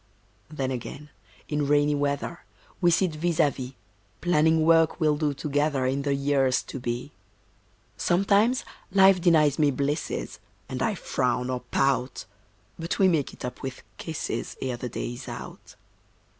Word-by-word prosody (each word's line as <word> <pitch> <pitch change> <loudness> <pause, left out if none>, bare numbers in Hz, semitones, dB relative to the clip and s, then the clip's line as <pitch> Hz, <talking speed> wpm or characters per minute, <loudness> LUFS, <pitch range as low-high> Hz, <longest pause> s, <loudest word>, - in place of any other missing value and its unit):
Then 135 -4 -3
again, 140 +4 -6 0.4
in 150 -1 -1
rainy 145 0 +3
weather, 145 +3 -2 0.4
We 175 - +5
sit 175 +1 +2
vis 165 +1 -1
à 150 -4 +4
vis, 130 0 -7 0.5
Planning 160 -2 +3
work 165 0 +4
we'll 155 -2 +3
do 150 -1 0
together 145 -2 0
In 135 +2 0
the 140 0 0
years 140 -2 +2
to 135 - -7
be. 120 +3 -4 0.9
Sometimes 205 +8 +2 0.3
Life 190 -1 +6
denies 155 -5 +4
me 150 -2 +4
blisses, 140 +3 -2 0.3
And 130 0 -5
I 215 - +1
frown 125 -5 -1
or 125 - -1
pout; 130 -2 0 0.5
But 165 +1 -2
we 195 - +5
make 155 -6 +1
it - - -8
up 125 - -6
with 130 -1 -6 0.2
kisses 160 -2 -4
Ere 130 -2 -3
the 125 +1 -5
day 120 - -4
is 120 - -9
out. - - -9
145 Hz, 155 wpm, -26 LUFS, 130-165 Hz, 0.9 s, Life